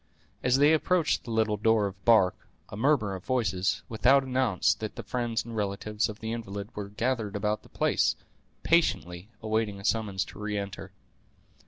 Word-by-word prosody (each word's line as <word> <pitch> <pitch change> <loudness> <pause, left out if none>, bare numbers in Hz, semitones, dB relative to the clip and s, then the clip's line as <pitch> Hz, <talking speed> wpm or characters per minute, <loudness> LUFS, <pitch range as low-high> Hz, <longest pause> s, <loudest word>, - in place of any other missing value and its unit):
As 125 +1 +3
they 145 +3 +5
approached 165 +1 +1
the - - -8
little 110 -2 +1
door 110 0 +3
of 95 -1 -7
bark, 110 -6 +5 0.4
a - - -7
murmur 115 -4 +2
of 95 -1 -7
voices 100 -8 0
without 130 +5 +4
announced 125 -7 +1
that 110 -1 -5
the - - -6
friends 120 -3 -2
and 115 -1 -7
relatives 105 +1 -1
of 105 - -9
the 110 0 -3
invalid 100 -3 -5
were 100 -1 -5
gathered 110 -1 -2
about 105 +1 -1
the - - -19
place, - - +1 0.5
patiently 95 - +1
awaiting 110 -2 -1
a 100 - -9
summons 105 -4 0
to - - -12
re 105 0 -3
enter. 100 -1 -6
110 Hz, 175 wpm, -28 LUFS, 100-120 Hz, 0.5 s, they